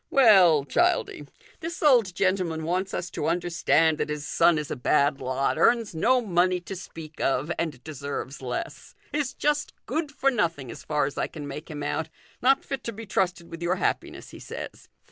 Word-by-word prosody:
" - - -51
Well, 190 - +6
Childie. 350 - +1 0.3
This 340 0 -5
old 235 - +4
gentleman 185 -4 0
wants 185 +4 -1
us 175 - -4
to - - -3
understand 165 -2 +2
that - - -1
his 150 -1 -4
son 165 +4 +3
is 150 -1 -4
a - - -1
bad 140 +2 +2
lot, 130 +4 -1
earn? 235 +6 +4
no 250 +10 +3
money 180 -3 +2
to 185 +2 -7
speak 165 -4 -10
of, 145 +4 0
and 155 -7 -3
deserves 140 -2 -6
less; 125 -1 -5 0.2
is 290 -3 -1
just 295 0 0
good 300 +3 -2
for 275 -1 +1
nothing 165 - -1
as - - -10
far 150 -2 0
as 140 - -4
I - - 0
can 150 -3 -8
make 145 +3 -7
him 150 -2 -5
out, 150 +2 -2 0.3
not 270 +2 +4
fit 270 -3 -4
to 230 - -2
be 225 +1 -9
trusted 185 -3 -1
with 165 0 -8
your 175 +2 +1
happiness, - - -3
he - - -11
says." - - -8
170 Hz, 195 wpm, -26 LUFS, 150-225 Hz, 0.3 s, Well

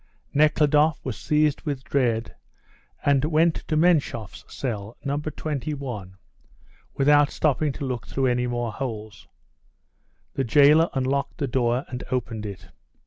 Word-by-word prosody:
Nekhludoff 150 +1 +3
was 130 -4 -3
seized 150 -1 +1
with 140 -3 -4
dread, 120 -3 0 0.7
and 140 -1 +3
went 160 +2 +2
to 155 - 0
Menshoff's 155 - +1
cell, 110 -4 -5
No. 140 +1 0
21, 140 -9 -5 0.8
without 145 +1 +4
stopping 150 0 +1
to 140 - -5
look 125 -5 -4
through 135 - -1
any 125 -1 +1
more 120 -1 -2
holes. 110 -3 -6 1.1
The 135 - -1
jailer 145 +6 +5
unlocked 135 +1 -1
the 140 - -1
door 125 0 0
and 125 0 -6
opened 115 -4 -3
it. 100 -2 -9
135 Hz, 130 wpm, -24 LUFS, 120-150 Hz, 1.1 s, jailer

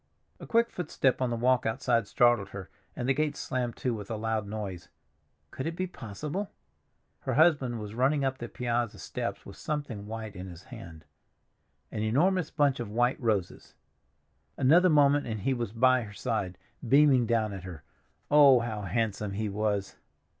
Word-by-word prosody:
A - - -10
quick 235 0 +2
footstep 140 -7 0
on 130 - +1
the 120 - -1
walk 125 +1 +2
outside 115 -1 0
startled 120 -5 +3
her, 95 -2 -9 0.2
and 125 - -3
the 135 - +4
gate 150 0 -1
slammed 125 -2 -3
to 125 - -2
with 105 -3 -7
a 115 - -2
loud 110 -1 -2
noise. 100 -4 -6 0.6
Could 130 - -4
it 165 - -3
be 185 - -1
possible? 150 - -5 0.7
Her - - -3
husband 140 -7 +3
was 105 -1 -7
running 135 +4 +2
up 130 0 -2
the 120 - -6
piazza 120 -2 -2
steps - - -5
with - - -11
something 140 -9 -4
white 110 -1 -6
in 90 +1 -7
his 85 -2 -11
hand—an 80 +5 -12
enormous 165 - +2
bunch 140 -3 +1
of 120 -3 -4
white 120 +5 +1
roses. 105 -7 -2 0.8
Another 170 +8 +5
moment 145 -2 +4
and 110 -3 -4
he 135 +7 +1
was 120 -5 -3
by 130 +3 +4
her 105 -3 -8
side, 105 -6 -3 0.3
beaming 135 -2 +5
down 110 -3 +1
at 95 - -6
her. 85 -5 -9 0.5
Oh, 140 -4 +7
how 110 -3 -4
handsome 105 +1 -2
he 105 +1 -2
was! 100 -1 -2
120 Hz, 170 wpm, -29 LUFS, 105-135 Hz, 0.8 s, Oh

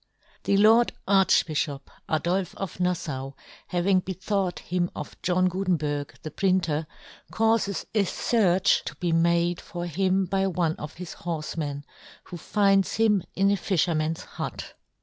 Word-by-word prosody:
The 200 - +3
Lord 225 +4 +5
Archbijhop 160 -7 +2 0.3
Adolfe 175 +4 0
ofNaJfau 165 -8 -3 0.3
having 185 +1 +2
he 190 - -2
thought 190 -1 -1
him 175 0 -1
of - - -7
John 185 +1 +2
Gutenberg^ 160 -6 -2
the 155 - -6
printer^ 165 -4 0 0.4
caufes 220 -3 +1
a 210 -2 +3
fearch 190 -2 +2
to - - -5
he 175 -2 0
made 170 +1 +2
for 175 0 -6
him 185 +3 +1
hy 195 0 +2
one 170 -3 0
of 150 - -8
his 180 0 -7
horfemen, 155 -3 -4 0.4
who 175 - -9
finds 195 +1 +2
him 215 -3 +3
in 195 +1 +3
a - - +3
fijherman's 165 -3 0
hut. - - -6
180 Hz, 135 wpm, -26 LUFS, 165-195 Hz, 0.4 s, Lord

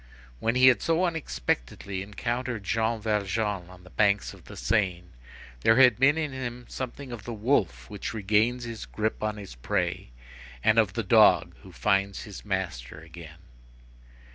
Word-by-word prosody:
When 115 - 0
he 130 +1 +7
had 125 - +2
so 165 +2 +2
unexpectedly 95 - -3
encountered 120 +3 -3
Jean 110 +3 0
Valjean 105 -3 -1
on 90 -1 -14
the 90 - -16
banks 105 -1 +2
of - - -16
the - - -11
Seine, 90 - 0 0.6
there 110 - +4
had 125 -1 +6
been 140 +4 +5
in 155 -3 -1
him 125 -2 -5
something 130 +1 -6
of 115 -4 -7
the 120 - -5
wolf 100 - 0
which 100 - -5
regains 110 +3 +1
his 115 -2 -7
grip 110 0 -2
on 105 0 -2
his 100 -7 -9
prey, - - -2 0.5
and - - +4
of - - +2
the - - -2
dog - - +5
who - - -13
finds 100 0 0
his 100 -4 -10
master 90 -11 -4
again. 80 0 -12
105 Hz, 165 wpm, -27 LUFS, 95-120 Hz, 0.6 s, he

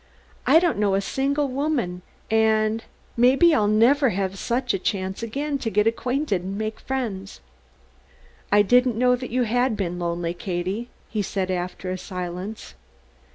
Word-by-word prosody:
I - - +7
don't 340 - +2
know 200 -2 +2
a - - +2
single 280 +7 0
woman 260 -10 -1 0.3
and 220 0 +2 0.3
may 245 +2 +5
be 340 +3 +5
I'll 210 -8 +3
never 245 +6 +4
have 195 -1 -2
such 240 0 -1
a 195 - -1
chance 190 +1 -2
again 280 +5 -2
to 235 - -2
get 210 0 +2
acquainted 230 - 0
and 190 +2 -5
make 215 0 -3
friends." 220 -8 -4 1.1
"I 205 0 +6
didn't 245 +2 +3
know 250 +1 +4
that 250 0 -6
you 250 +2 +1
had 245 0 +1
been 180 -3 -3
lonely, 170 0 -2
Katie," 190 +4 -3 0.2
he 215 - -2
said 190 -1 -2
after 180 +1 -3
a 185 - -4
silence. 180 +3 -6
220 Hz, 160 wpm, -24 LUFS, 190-250 Hz, 1.1 s, I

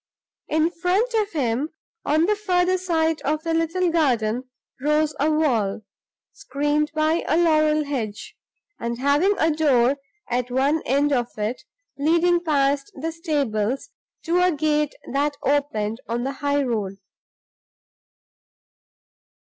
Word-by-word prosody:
In 315 +2 +1
front 375 +8 0
of 430 -3 0
him, 270 0 0 0.4
on 310 +3 +3
the 420 +3 +2
further 370 -3 +1
side 325 -3 0
of 305 +2 -1
the 330 -1 -1
little 330 +2 +1
garden, 250 -6 +1 0.3
rose 300 +1 +2
a 295 +3 +2
wall, 235 -10 +1 0.5
screened 295 +2 -1
by 310 +2 +1
a 315 - +2
laurel 310 -2 +3
hedge, 230 -8 -5 0.4
and 235 0 -3
having 290 +10 +2
a 320 - +2
door 280 -4 +3 0.3
at 250 0 -1
one 275 +5 +1
end 285 +3 +2
of 240 -3 +1
it, 215 +4 -2 0.4
leading 340 +4 +3
past 280 -3 +1
the 320 +4 -3
stables 275 - -2 0.3
to 350 +2 +1
a 360 0 +4
gate 300 -1 0 0.2
that 285 +1 0
opened 250 -6 0
on 235 +1 -1
the 270 - -2
high 285 0 +1
road. 210 -6 -2
295 Hz, 130 wpm, -23 LUFS, 260-325 Hz, 0.5 s, a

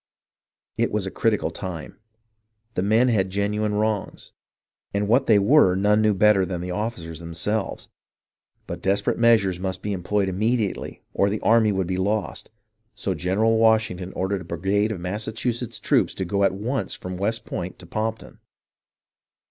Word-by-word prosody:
It - - +1
was - - -1
a - - -4
critical - - 0
time. 90 -1 -7 0.7
The 90 - -1
men 110 +6 +3
had 95 -5 +1
genuine 105 +2 -1
wrongs, 105 -1 -2 0.6
and 100 0 0
what 125 +5 +3
they 110 - +6
were 100 -2 +5
none 105 +3 +3
knew 105 -1 +3
better 105 0 +4
than 90 -1 -3
the 90 +1 -4
officers 90 -6 -4
themselves; 85 +6 -3 0.8
but - - -6
desperate 100 +3 0
measures 110 -6 +4
must 95 0 -4
be 105 - -2
employed 100 +2 0
immediately 105 +3 -1
or 100 - +2
the 105 +1 -2
army 110 -1 +4
would 95 -2 0
be 90 +1 -2
lost, 105 +3 -2 0.5
so 95 - -2
General 100 +7 +1
Washington 110 -5 +2
ordered 95 0 -2
a - - -7
brigade 95 +6 0
of 100 - -4
Massachusetts 110 +5 -3
troops - - +1
to 95 - -3
go 100 +3 0
at 95 -1 +2
once 110 +1 -2
from 90 0 -6
West 105 +5 -1
Point 90 +1 -5
to 90 - -13
Pompton. 110 +5 -4
100 Hz, 160 wpm, -24 LUFS, 95-110 Hz, 0.8 s, they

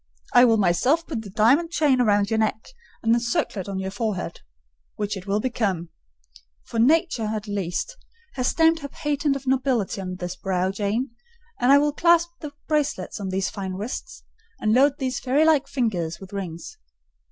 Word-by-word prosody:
"I 245 - +8
will 225 -2 +4
myself 250 - +2
put 265 -10 -4
the 210 - -10
diamond 250 - +3
chain 290 -6 +2
round 205 -3 +2
your 220 - +2
neck, 220 0 -1 0.3
and 225 0 +4
the 235 - +3
circlet 225 -4 -2
on 195 - -3
your 190 0 -3
forehead,—which 175 - -6
it 190 0 -9
will 200 +1 +1
become: 200 -8 -1 0.7
for 230 - -4
nature, 305 -1 +3
at 215 -1 -4
least, 205 - -3 0.4
has 255 -1 -1
stamped 325 0 +3
her 285 - -6
patent 290 0 -1
of 275 0 -6
nobility 255 -7 0
on 185 -1 -5
this 180 -1 -5
brow, 185 -1 -1
Jane; 210 +6 -2 0.5
and 250 +2 +4
I 280 - +8
will 295 0 +2
clasp 340 +2 +4
the 300 -2 -7 0.2
bracelets 290 - -1
on 195 -2 -4
these 190 +1 -1
fine 190 -2 -5
wrists, 210 +6 -6 0.4
and 215 0 +1
load 270 +3 +5
these 260 -3 -2
fairy 275 +5 +2
like 310 -3 +3
fingers 185 - -2
with 190 0 -12
rings." 190 - -6
225 Hz, 175 wpm, -24 LUFS, 190-275 Hz, 0.7 s, I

